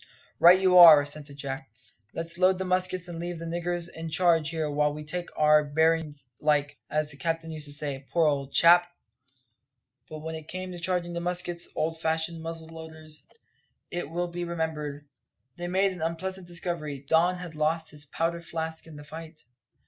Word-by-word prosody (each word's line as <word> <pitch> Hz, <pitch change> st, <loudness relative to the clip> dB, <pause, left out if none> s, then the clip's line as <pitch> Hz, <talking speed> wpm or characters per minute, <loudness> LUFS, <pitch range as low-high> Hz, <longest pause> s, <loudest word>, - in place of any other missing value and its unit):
"Right 180 Hz, +2 st, +8 dB
you 185 Hz, -1 st, +6 dB
are," 165 Hz, -4 st, +11 dB
assented 145 Hz, 0 st, -7 dB
Jack. 135 Hz, -1 st, -5 dB, 0.4 s
"Let's 165 Hz, +1 st, -5 dB
load 185 Hz, 0 st, +4 dB
the 190 Hz, -, -3 dB
muskets 185 Hz, -1 st, 0 dB
and 170 Hz, -1 st, -6 dB
leave 175 Hz, 0 st, -4 dB
the 165 Hz, -, -7 dB
niggers 175 Hz, +1 st, -2 dB
in 165 Hz, -1 st, -7 dB
charge 165 Hz, -1 st, +3 dB
here 160 Hz, -2 st, -2 dB
while 150 Hz, 0 st, +1 dB
we 150 Hz, -, -7 dB
take 175 Hz, +3 st, -3 dB
our 150 Hz, 0 st, +5 dB
bearin's 155 Hz, -1 st, 0 dB
like, 145 Hz, -1 st, +1 dB
as 155 Hz, -1 st, 0 dB
the 140 Hz, -, -4 dB
captain 165 Hz, 0 st, -2 dB
used 155 Hz, -1 st, -4 dB
to -, -, -7 dB
say, 145 Hz, -2 st, -3 dB
poor 170 Hz, -2 st, +2 dB
old 140 Hz, -2 st, 0 dB
chap!" 175 Hz, +3 st, +6 dB, 1.2 s
But 155 Hz, -1 st, -8 dB
when 160 Hz, 0 st, -4 dB
it 160 Hz, -1 st, -8 dB
came 185 Hz, 0 st, -4 dB
to 175 Hz, -, -7 dB
charging 175 Hz, 0 st, -1 dB
the 170 Hz, -, -2 dB
muskets 175 Hz, 0 st, -1 dB
old 160 Hz, +1 st, -2 dB
fashioned 160 Hz, +1 st, -1 dB
muzzle 165 Hz, 0 st, -7 dB
loaders, 160 Hz, -1 st, -8 dB, 0.6 s
it 175 Hz, -4 st, -4 dB
will 175 Hz, +2 st, -2 dB
be 175 Hz, 0 st, -4 dB
remembered 155 Hz, -4 st, -4 dB, 0.5 s
they 175 Hz, 0 st, -4 dB
made 190 Hz, +2 st, +2 dB
an 180 Hz, -3 st, -8 dB
unpleasant 180 Hz, +3 st, -4 dB
discovery. 165 Hz, -5 st, -3 dB
Don 175 Hz, +4 st, +3 dB
had 175 Hz, -2 st, -8 dB
lost 155 Hz, +2 st, 0 dB
his 150 Hz, -1 st, -9 dB
powder 165 Hz, +3 st, -2 dB
flask 160 Hz, -1 st, -5 dB
in 160 Hz, -, -11 dB
the 145 Hz, -, -10 dB
fight. 160 Hz, +1 st, -10 dB
165 Hz, 185 wpm, -27 LUFS, 150-175 Hz, 1.2 s, are